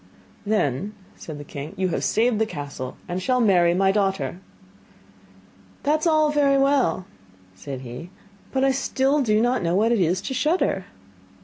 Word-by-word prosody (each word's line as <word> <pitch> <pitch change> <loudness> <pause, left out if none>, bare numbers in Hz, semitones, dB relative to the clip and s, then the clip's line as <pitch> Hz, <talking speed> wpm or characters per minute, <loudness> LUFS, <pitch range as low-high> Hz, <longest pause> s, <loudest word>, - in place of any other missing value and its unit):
'Then,' 205 - 0 0.2
said 155 -3 -8
the 145 - -8
king, 145 +1 -8
'you 185 0 0
have 165 - -2
saved 225 0 +2
the 220 - +3
castle, 145 -7 -6
and 180 +1 -3
shall 255 +4 +1
marry 175 -6 +4
my 190 +1 +3
daughter.' 195 -3 -1 1.4
'That 300 +2 +2
is 310 - 0
all 310 -2 +3
very 280 -2 +3
well,' 275 -8 +2 0.5
said 130 +7 -7
he, 125 +7 -8 0.4
'but 265 0 +2
still 270 +1 +1
I - - +2
do 215 -4 +2
not 245 +1 +1
know 170 0 0
what 220 +4 +3
it 235 - +2
is 180 +1 +2
to - - -4
shudder! 265 - 0
210 Hz, 170 wpm, -23 LUFS, 170-265 Hz, 1.4 s, marry